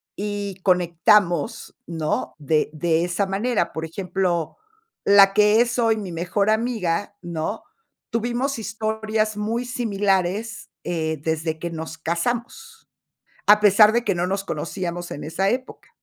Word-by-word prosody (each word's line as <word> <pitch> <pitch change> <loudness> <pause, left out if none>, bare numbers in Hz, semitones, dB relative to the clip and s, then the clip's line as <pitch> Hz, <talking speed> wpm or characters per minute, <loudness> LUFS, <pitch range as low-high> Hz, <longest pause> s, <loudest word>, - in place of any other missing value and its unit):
y 205 -2 -4
conectamos, 175 -1 +2
¿no?, 160 -2 -2
de 150 +1 +1
de 165 +1 +1
esa 180 +3 0
manera. 210 +5 0
Por 160 0 -4
ejemplo, 180 -1 -2 0.5
la 200 -1 +7
que 210 +2 +5
es 245 +1 0
hoy 225 -1 +3
mi 195 -4 -5
mejor 180 +5 0
amiga, 215 -5 0
¿no?, 170 +4 -4 0.5
tuvimos 240 +3 -1
historias 215 0 -2
muy 230 +4 -2
similares, 205 -3 -1
eh, 160 -2 -2
desde 160 0 -2
que 170 - -4
nos 160 0 -6
casamos, 240 - -4 0.6
a 210 +1 +7
pesar 210 +1 +6
de 240 0 +1
que 195 -3 +1
no 175 +1 0
nos 195 +1 -1
conocíamos 175 +2 -4
en 145 - -6
esa 190 +5 0
época. 255 +1 -4
195 Hz, 135 wpm, -23 LUFS, 170-220 Hz, 0.6 s, la